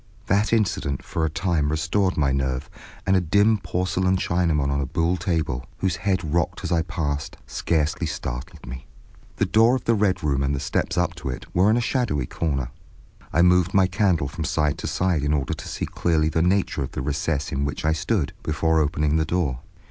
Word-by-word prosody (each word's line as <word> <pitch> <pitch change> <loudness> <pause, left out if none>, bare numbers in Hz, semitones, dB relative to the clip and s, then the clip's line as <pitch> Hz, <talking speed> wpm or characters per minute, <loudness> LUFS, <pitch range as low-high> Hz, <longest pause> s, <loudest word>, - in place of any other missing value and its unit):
That 100 +3 +2
incident 95 - 0
for 80 - -1
a - - 0
time 80 -2 0
restored 85 +5 0
my 70 -3 +2
nerve, 65 -1 -2 0.3
and 95 - +3
a 95 - +4
dim 100 +6 +3
porcelain 95 0 0
Chinaman 85 -6 +1
on 70 0 0
a 70 - -2
buhl 80 +6 +1
table, 80 -8 -2
whose 95 -3 -1
head 95 -2 0
rocked 85 +3 0
as 90 - -3
I 85 -2 +3
passed, 75 -4 -3
scarcely 80 -2 -1
startled 75 +6 -6
me. 65 +2 -8 0.5
The - - +1
door 115 +3 +4
of 130 - -3
the 115 - +3
Red 95 -4 +1
Room 70 -3 +1
and 70 +1 0
the - - -3
steps - - -1
up 85 -1 +1
to 80 - -5
it 65 - -5
were 95 +4 +4
in 110 - +4
a - - +2
shadowy 115 - 0
corner. 70 -4 -2 0.6
I 85 - +4
moved 90 +1 +4
my 95 -1 +6
candle 90 -6 +1
from 80 +4 -5
side 75 -2 0
to - - -4
side 90 -5 +1
in 75 +1 +1
order 70 -2 0
to - - -7
see - - -3
clearly 80 -2 +1
the 80 - +1
nature 90 -3 +1
of 65 - -4
the - - -3
recess 75 +1 -1
in 70 - -1
which 70 +2 -3
I 80 - +3
stood, 85 0 -1
before 80 +1 +1
opening 75 0 +1
the 80 - +1
door. 75 -7 -1
80 Hz, 210 wpm, -24 LUFS, 70-95 Hz, 0.6 s, my